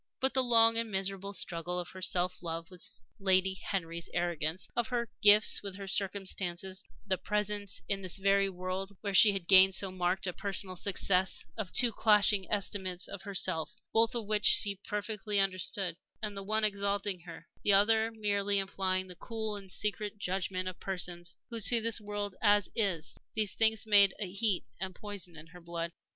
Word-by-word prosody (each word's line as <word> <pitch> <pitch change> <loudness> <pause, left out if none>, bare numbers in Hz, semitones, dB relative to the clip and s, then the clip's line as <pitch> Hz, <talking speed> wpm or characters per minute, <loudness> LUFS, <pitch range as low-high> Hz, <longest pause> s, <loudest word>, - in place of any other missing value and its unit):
But 265 0 +1
the 260 - +5
long 230 -2 +4
and 230 -1 -2
miserable 195 0 -3
struggle 175 -1 -3
of 175 -1 -4
her 185 - -11
self 180 -1 0
love 165 0 -5
with 115 -11 -3 0.2
Lady 190 -1 +3
Henry's 170 -3 -4
arrogance, 170 -1 -1
of 240 -2 0
her 235 -2 -3
gifts 210 +1 +6
with 200 -2 -6
her 195 0 -8
circumstances; 190 -1 -1 0.2
the 190 -2 -1
presence 210 -1 -3
in 195 -1 -1
this 185 0 +3
very 195 0 +2
world, 185 +2 -5
where 200 -1 -3
she 205 +2 +8
had 190 -3 -4
gained 190 0 +7
so 195 -1 -1
marked 185 +1 -1
a 180 - -2
personal 195 -1 -3
success, 190 0 0
of 210 -5 -5
two 245 -3 +5
clashing 210 -2 +3
estimates 190 -3 -2
of 200 - -8
herself, 190 -3 -2 0.2
both 225 +1 +2
of 230 -3 -3
which 210 0 0
she 200 -2 +5
perfectly 210 0 -1
understood 185 -2 -1 0.3
the 205 -2 -3
one 215 +2 -1
exalting 200 -2 0
her, 165 -1 -11 0.2
the 205 - +4
other 220 +3 +4
merely 205 -2 +1
implying 190 -1 -1
the 185 - -10
cool 220 +3 -4
and 195 -2 -8
secret 210 +1 -2
judgment 185 -1 -3
of 185 - -6
persons 175 -2 -4
who 230 - -4
see 235 +2 +3
the 230 0 0
world 205 -1 -5
as 205 -2 +3
it - - -3
is 175 -6 0 0.2
these 215 -3 0
things 220 -1 +3
made 200 -3 +6
a 190 -4 -3
heat 200 -2 +1
and 190 -1 -4
poison 195 -5 -7
in 155 - -10
her 175 +2 -15
blood. 170 0 -5
195 Hz, 180 wpm, -31 LUFS, 185-210 Hz, 0.3 s, she